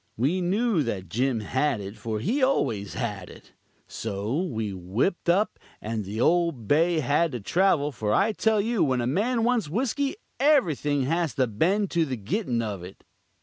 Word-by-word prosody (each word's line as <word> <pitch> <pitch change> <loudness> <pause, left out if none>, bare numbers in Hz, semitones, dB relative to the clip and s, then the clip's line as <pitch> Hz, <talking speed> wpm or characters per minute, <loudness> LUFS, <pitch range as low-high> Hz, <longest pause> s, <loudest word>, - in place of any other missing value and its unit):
We 150 +11 +1
knew 200 +1 +1
that 100 - -3
Jim 120 +3 0
had 130 +3 0
it, 100 +1 -7
for 110 0 -4
he 235 - 0
always 120 - 0
had 105 -7 -4
it. - - -15 0.3
So 110 - -3
we 110 - -3
whipped 100 - -1
up, 195 +5 +2 0.2
and 110 0 -3
the 105 +3 -5
old 165 -6 +1
Bay 165 +2 +3
had 145 +3 +1
to 120 - -3
travel, 150 - +2
for 110 -5 -2
I 200 - +3
tell 220 0 +1
you 225 +1 +1
when 130 -3 +1
a - - -1
man 225 - +1
wants 235 -8 +1
whiskey 270 - -1 0.2
everything 160 - +2
has 165 +3 0
to 130 -3 +3
bend 180 - 0
to 170 -1 +2
the 130 -4 -4
gittin' 120 - -1
of 105 -4 -4
it. 90 +2 -11
145 Hz, 180 wpm, -26 LUFS, -, 0.3 s, Bay